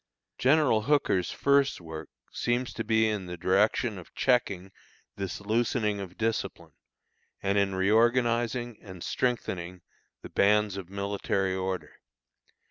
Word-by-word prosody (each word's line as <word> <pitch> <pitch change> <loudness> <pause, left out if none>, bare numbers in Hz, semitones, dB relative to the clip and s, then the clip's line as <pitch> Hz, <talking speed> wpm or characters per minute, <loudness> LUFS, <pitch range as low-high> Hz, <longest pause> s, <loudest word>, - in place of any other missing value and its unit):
General 130 -5 +4
Hooker's 115 - +2
first 140 0 +2
work 80 -2 -8 0.2
seems 120 +1 -1
to - - -3
be 110 -1 +3
in 105 -4 -2
the 90 0 -6
direction 100 +4 +2
of 90 - -14
checking 100 -7 +1 0.4
this 100 -3 -4
loosening 110 0 0
of 95 -2 -8
discipline, 115 0 -2 0.7
and 100 0 +1
in 100 -1 +2
reorganizing 120 +3 +2
and 95 -4 -10
strengthening 90 -8 -2 0.4
the - - -8
bands 105 0 +3
of 95 -3 -7
military 100 -1 -1
order. 95 0 -4
105 Hz, 125 wpm, -28 LUFS, 95-120 Hz, 0.7 s, General